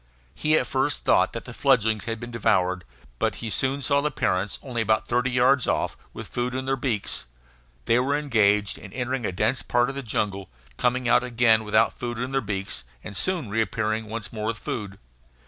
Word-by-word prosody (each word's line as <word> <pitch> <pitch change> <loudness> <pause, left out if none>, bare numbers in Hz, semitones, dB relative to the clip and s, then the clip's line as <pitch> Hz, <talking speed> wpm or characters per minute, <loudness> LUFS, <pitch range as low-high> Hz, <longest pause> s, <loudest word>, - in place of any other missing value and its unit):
He 155 +1 +2
at - - +1
first 135 +2 0
thought - - +4
that - - -6
the - - -8
fledglings 110 -6 +2
had 115 -1 -3
been 120 +1 -7
devoured, 95 -5 +1 0.3
but - - +1
he 110 - -5
soon 135 +5 0
saw 140 +2 +3
the 150 - +1
parents, 100 -8 -1
only 125 -4 -2
about 110 0 +1
thirty 125 +2 +1
yards 125 +2 +3
off, - - 0 0.2
with - - -7
food 125 +1 -3
in 130 0 -2
their 135 0 +1
beaks. 115 - -2 0.6
They 120 - +4
were 140 +3 +1
engaged 105 -8 +2
in 100 - -11
entering 125 -2 -2
a - - -2
dense 95 +8 +1
part 120 +1 +1
of 135 - -5
the 140 - -3
jungle, 100 -5 -2 0.3
coming 125 - +1
out 120 +1 +4
again 115 -3 +3
without 110 -1 +3
food 120 -1 -3
in 125 +2 -3
their 135 0 +1
beaks, 95 - -4 0.2
and 100 - -8
soon 165 - 0
reappearing 110 0 0
once 110 0 -5
more 110 -1 -3
with 115 -1 -1
food. 100 -4 -5
115 Hz, 200 wpm, -25 LUFS, 105-130 Hz, 0.6 s, thought